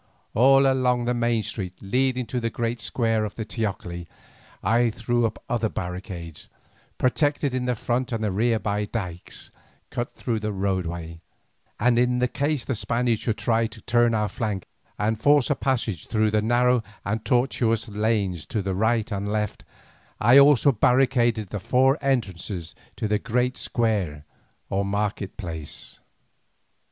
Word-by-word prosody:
All 135 Hz, +4 st, +6 dB
along 125 Hz, -2 st, +2 dB
the 120 Hz, -, +1 dB
main 120 Hz, -2 st, +1 dB
street 95 Hz, -2 st, -5 dB
leading 125 Hz, +4 st, 0 dB
to 125 Hz, +2 st, -2 dB
the 115 Hz, -1 st, -1 dB
great 115 Hz, 0 st, -2 dB
square 115 Hz, -1 st, 0 dB
of 105 Hz, -, -4 dB
the 110 Hz, -, -4 dB
teocalli 95 Hz, -6 st, -4 dB, 0.6 s
I 120 Hz, +1 st, +3 dB
threw 120 Hz, +1 st, 0 dB
up 110 Hz, -, -9 dB
other 115 Hz, -4 st, 0 dB
barricades, 90 Hz, -3 st, -6 dB, 0.5 s
protected 140 Hz, +2 st, +1 dB
in 130 Hz, -1 st, -1 dB
the 125 Hz, -1 st, 0 dB
front 125 Hz, +3 st, -1 dB
and 110 Hz, -2 st, -1 dB
rear 115 Hz, +2 st, +2 dB
by 105 Hz, -1 st, -1 dB
dykes 90 Hz, -6 st, -6 dB, 0.4 s
cut 120 Hz, 0 st, -4 dB
through 115 Hz, -3 st, -2 dB
the 105 Hz, 0 st, -2 dB
roadway, 85 Hz, -4 st, -3 dB, 0.6 s
and 120 Hz, -1 st, +3 dB
in 125 Hz, 0 st, +2 dB
case 145 Hz, -1 st, -1 dB
the -, -, -1 dB
Spaniards 115 Hz, 0 st, 0 dB
should 110 Hz, -, -1 dB
try 115 Hz, -1 st, +1 dB
to 110 Hz, -, -12 dB
turn 120 Hz, -1 st, +3 dB
our 105 Hz, -1 st, +1 dB
flank 100 Hz, -2 st, -3 dB, 0.3 s
and 110 Hz, +2 st, -1 dB
force 145 Hz, -1 st, +4 dB
a -, -, +3 dB
passage 115 Hz, -, -1 dB
through 110 Hz, -1 st, +1 dB
the 105 Hz, 0 st, +2 dB
narrow 120 Hz, +2 st, +3 dB, 0.2 s
and 110 Hz, +2 st, -2 dB
tortuous 120 Hz, -3 st, +1 dB
lanes 105 Hz, -6 st, -1 dB
to 105 Hz, -, -2 dB
the 95 Hz, 0 st, -1 dB
right 110 Hz, +3 st, +1 dB
and 100 Hz, 0 st, -2 dB
left, 105 Hz, -1 st, -2 dB, 0.6 s
I 120 Hz, +5 st, +7 dB
also 140 Hz, 0 st, +6 dB
barricaded 120 Hz, -3 st, +2 dB
the 105 Hz, -, -4 dB
four 130 Hz, -, +3 dB
entrances 100 Hz, -, -2 dB, 0.2 s
to 110 Hz, -, -2 dB
the 105 Hz, 0 st, +1 dB
great 125 Hz, +3 st, 0 dB
square 100 Hz, -11 st, -1 dB, 0.4 s
or 100 Hz, +1 st, 0 dB
market 100 Hz, 0 st, -2 dB
place. 80 Hz, -6 st, -7 dB
115 Hz, 155 wpm, -25 LUFS, 100-125 Hz, 0.6 s, I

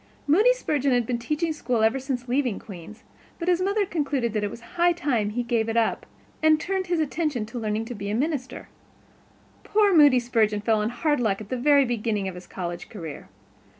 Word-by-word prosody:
Moody 405 Hz, +12 st, +5 dB
Spurgeon 285 Hz, -, 0 dB
had 245 Hz, -1 st, +2 dB
been 240 Hz, 0 st, -2 dB
teaching 305 Hz, +7 st, -1 dB
school 240 Hz, -6 st, -1 dB
ever 225 Hz, +5 st, +3 dB
since 260 Hz, -2 st, -4 dB
leaving 250 Hz, -4 st, 0 dB
Queen's, 195 Hz, +2 st, -11 dB, 0.3 s
but 340 Hz, -, -5 dB
his 360 Hz, 0 st, +3 dB
mother 400 Hz, +3 st, +1 dB
had 395 Hz, -, -2 dB
concluded 280 Hz, -8 st, -1 dB
it 205 Hz, -1 st, 0 dB
was 230 Hz, -, -10 dB
high 350 Hz, +6 st, +1 dB
time 255 Hz, -11 st, 0 dB
he 240 Hz, +3 st, -2 dB
gave 230 Hz, -2 st, 0 dB
it 225 Hz, -, -1 dB
up 230 Hz, -, 0 dB, 0.3 s
and 310 Hz, 0 st, +4 dB
turned 380 Hz, +3 st, -2 dB
his 350 Hz, -2 st, 0 dB
attention 300 Hz, -6 st, -1 dB
to 235 Hz, +3 st, -7 dB
learning 215 Hz, 0 st, -2 dB
how 225 Hz, -, -10 dB
to -, -, -4 dB
be 200 Hz, -2 st, -5 dB
a 210 Hz, -, -1 dB
minister. 275 Hz, 0 st, -3 dB, 1.0 s
Poor 410 Hz, -3 st, +3 dB
Moody 290 Hz, -5 st, +7 dB
Spurgeon 220 Hz, -4 st, +1 dB
fell 220 Hz, 0 st, +2 dB
on 210 Hz, +1 st, 0 dB
hard 295 Hz, +4 st, 0 dB
luck 210 Hz, -5 st, 0 dB
at 215 Hz, -1 st, -10 dB
the -, -, -1 dB
very 280 Hz, +2 st, +4 dB
beginning 220 Hz, -4 st, -1 dB
of 190 Hz, -, -4 dB
his 180 Hz, 0 st, -11 dB
college 175 Hz, -2 st, -6 dB
career. 165 Hz, -8 st, -8 dB
245 Hz, 215 wpm, -25 LUFS, 220-305 Hz, 1.0 s, Moody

